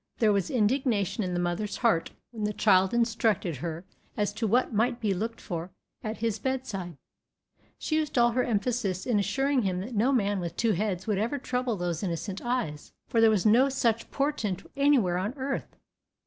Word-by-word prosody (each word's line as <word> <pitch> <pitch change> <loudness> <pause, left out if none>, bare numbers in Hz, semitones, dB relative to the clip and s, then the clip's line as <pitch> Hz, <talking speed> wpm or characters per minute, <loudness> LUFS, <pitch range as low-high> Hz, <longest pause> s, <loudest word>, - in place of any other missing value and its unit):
There 215 -3 +4
was 195 -3 0
indignation 225 -3 +1
in 180 -1 -2
the - - 0
mother's 175 +4 -2
heart 170 -9 +2 0.2
when 225 -3 -6
the 210 0 0
child 190 -3 +4
instructed 225 - +1
her 165 +5 -5 0.3
as 205 -1 0
to 220 +2 -1
what 240 +3 +2
might 235 +3 +1
be 210 -4 +1
looked 225 +5 -3
for 170 -1 -5 0.3
at 215 0 -4
his 225 -2 -1
bedside; 215 - -3 0.8
she 310 - -1
used 305 -3 -1
all 240 0 +5
her 250 +2 +1
emphasis 215 -4 -1
in 235 -5 +2
assuring 270 +7 +1
him 185 -4 -1
that 235 +6 -6
no 230 +5 +2
man 205 -6 +1
with 170 -1 -4
two 230 -1 +2
heads 190 -1 -1
would 210 -3 0
ever 235 +7 -1
trouble 250 -3 -1
those 175 -2 -2
innocent 190 +2 -3
eyes, 240 -12 -3 0.2
for 230 - +2
there 225 - +7
was 215 -3 +1
no 240 +6 +5
such 230 -4 0
portent 230 -10 -1
anywhere 265 -11 +3
on 205 +8 -3
earth. 270 +1 -4
215 Hz, 190 wpm, -28 LUFS, 190-245 Hz, 0.8 s, there